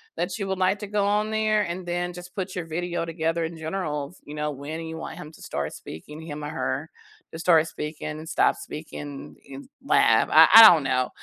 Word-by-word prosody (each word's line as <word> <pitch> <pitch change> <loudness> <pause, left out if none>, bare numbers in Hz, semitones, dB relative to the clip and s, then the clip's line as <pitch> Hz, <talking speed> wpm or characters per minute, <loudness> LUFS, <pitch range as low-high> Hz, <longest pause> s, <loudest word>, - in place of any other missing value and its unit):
that 180 +1 -3
you 200 - -3
would 190 -1 -3
like 190 +2 +2
to 210 - -6
go 205 0 0
on 210 +1 +1
there 215 -1 +1
and 180 0 -5
then 175 0 -3
just 180 +1 -11
put 190 -1 -4
your 180 - -4
video 175 +1 -3
together 165 0 -2
in 165 +1 -5
generals, 160 -2 -4
you 145 - -10
know, 150 0 -2
when 145 +3 -7
you 160 0 -6
want 160 - -7
him 150 - -9
to - - -16
start 70 +1 -4
speaking- 150 - -10
him 150 -2 -7
or - - -4
her- - - -3 0.4
to 160 - -7
start 165 -2 +4
speaking 150 -1 -6
and 160 - -9
stop - - +2
speaking 145 -2 -9
in 135 - -11 0.2
lab. - - +3
I - - +8
I 225 - +12
don't 160 -4 +3
know. 130 -2 0
165 Hz, 220 wpm, -25 LUFS, 150-185 Hz, 0.4 s, I